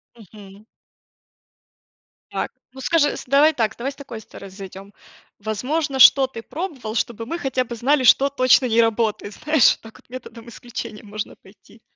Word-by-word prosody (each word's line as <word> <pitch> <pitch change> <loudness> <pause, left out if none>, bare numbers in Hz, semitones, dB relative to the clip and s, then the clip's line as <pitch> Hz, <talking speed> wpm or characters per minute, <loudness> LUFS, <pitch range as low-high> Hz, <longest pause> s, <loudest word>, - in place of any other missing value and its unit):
Мгм. 205 -1 -15 1.7
Так, - - -3 0.2
ну, 265 - -10
скажи 300 -2 +2
с - - -8
Давай 285 +4 +4
так, 220 -4 -1
давай 260 +4 -3
с 275 - -15
такой 245 -6 -9
стороны 200 -2 -12
зайдем. 195 +1 -11 0.5
Возможно, 265 +7 -2
что 265 +1 +8
ты 230 -3 -9
пробовал, 270 - -6
чтобы 230 -1 -2
мы 335 +8 -4
хотя 260 -5 -1
бы 235 -1 -7
знали, 260 +4 +2
что 270 +3 +5
точно 255 -1 +4
не 230 0 +3
работает, 220 -2 -1
знаешь, 300 0 +4
вот - - -5
так 225 0 -14
вот - - -26
методом 240 -2 -10
исключения 230 -2 -8
можно 210 0 -6
пойти. 210 +3 -21
235 Hz, 165 wpm, -21 LUFS, 215-275 Hz, 1.7 s, что